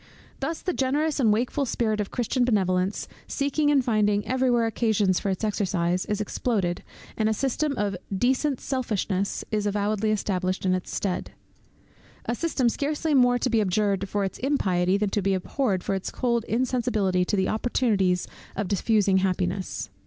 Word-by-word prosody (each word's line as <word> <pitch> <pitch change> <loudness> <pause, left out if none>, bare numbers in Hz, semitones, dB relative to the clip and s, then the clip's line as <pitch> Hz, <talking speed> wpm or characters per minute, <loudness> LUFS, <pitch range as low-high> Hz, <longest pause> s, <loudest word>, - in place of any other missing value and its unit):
Thus 325 - -3
the 365 - -1
generous 290 +3 0
and 230 -5 +4
wakeful 245 +6 0
spirit 215 -3 0
of 205 - -4
Christian 245 +1 0
Benevolence, 190 -4 +1 0.2
seeking 290 +1 0
and 275 -3 +3
finding 210 -3 +2
every 260 +3 +1
where 240 -1 +3
occasions 215 -4 +1
for 200 - -2
its 190 +2 -2
exercise, 185 -4 0
is 210 -2 -1
exploded, 205 -4 -1 0.3
and 220 -1 +1
a 220 - +1
system 275 +3 -1
of 205 -2 0 0.2
decent 255 +7 +1
selfishness 210 -7 -2
is 210 -1 0
avowedly 205 +1 0
established 185 -3 -1
in 185 - +3
its 185 -1 -3
stead; 190 -3 -3 0.9
a 235 - -1
system 270 -2 0
scarcely 295 +5 -1
more 245 -2 +5
to 250 - 0
be 225 -2 +3
abjured 200 0 0
for 205 0 0
its 190 - -4
impiety, 190 -9 +1
than 205 -1 -1
to 205 - 0
be 195 0 +1
abhorred 190 0 -1
for - - -1
its 190 -1 -2
cold 235 -3 0
insensibility 225 -6 +1
to 195 - -1
the 190 -1 +1
opportunities 210 -5 +1 0.3
of 205 - -2
diffusing 200 -1 +2
happiness. 185 - -1
210 Hz, 165 wpm, -26 LUFS, 190-245 Hz, 0.9 s, more